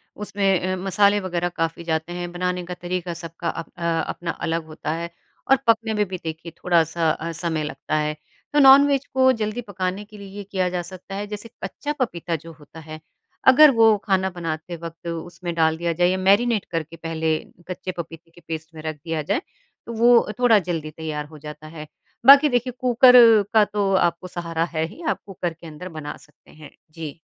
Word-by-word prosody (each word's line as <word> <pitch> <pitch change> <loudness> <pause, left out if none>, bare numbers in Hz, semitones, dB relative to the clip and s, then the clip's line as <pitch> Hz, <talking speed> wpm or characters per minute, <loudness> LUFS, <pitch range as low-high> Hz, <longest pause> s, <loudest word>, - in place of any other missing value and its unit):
उसमें 195 -2 0
अ, - - -1
मसाले 200 +2 +3
वगैरह 175 -2 -2
काफ़ी 165 0 -3
जाते 160 +1 -2
हैं, 175 0 -5
बनाने 180 0 -2
का 180 - -5
तरीका 175 0 -4
सबका 165 0 -5
अप - - -6
अ, 170 -1 0
अपना 170 -1 -4
अलग 165 0 -3
होता 155 -1 -5
है 170 +1 -4 0.4
और - - +9
पकने 225 -1 +3
में 210 -1 +1
भी 185 -1 -5
देखिए 160 +1 -6
थोड़ा-सा 165 -2 +2
अ, 165 +2 -4
समय 165 -1 -2
लगता 150 +1 -4
है। 150 0 0 0.4
तो 295 - +4
नॉन-वेज 275 0 +7
को 260 0 +5
जल्दी 215 +3 -2
पकाने 195 -1 -4
के 210 0 -14
लिए 200 -1 -10
ये 205 - -5
किया 190 -2 -1
जा 180 -1 -2
सकता 185 +2 -9
है, 205 +1 -4
जैसे 210 +2 -7
कच्चा 290 +10 -4
पपीता 170 -8 -2
जो 165 +2 -9
होता 150 +2 -14
है, 155 0 -9 0.5
अगर 275 +3 +9
वो 225 -3 +5
खाना 190 -2 +1
बनाते 165 -1 -5
वक्त 170 +1 -9
उसमें 170 +1 -5
डाल 160 -1 +2
दिया 170 0 -1
जाए 175 +2 +2
या 185 - 0
मैरिनेट 205 +3 +3
करके 165 0 -4
पहले 160 -1 -1 0.3
कच्चे 185 0 -5
पपीते 165 0 -8
के 175 - -18
पेस्ट 160 0 -6
में 155 - -8
रख 155 -1 -4
दिया 160 -2 -2
जाए, 155 - -1 0.5
वो 235 +1 +4
थोड़ा 230 -4 +5
जल्दी 165 -4 -4
तैयार 155 -1 -5
हो 155 +1 -13
जाता 150 +1 -10
है। 155 -1 -9 0.4
बाकी 280 +3 +9
देखिए 245 0 0
कुकर 250 0 +6 0.4
का 220 -1 +6
तो 205 -1 -1
आपको 175 0 +1
सहारा 170 -2 -3
है 160 +1 +1
ही। 330 - -13
आपको 195 - -4
कुकर 175 -1 -3
के 165 0 -13
अंदर 160 +4 -8
बना 145 0 -6
सकते 150 - -22
हैं। 155 -1 -13 0.2
जी। 160 -1 -8
175 Hz, 200 wpm, -23 LUFS, 160-205 Hz, 0.5 s, और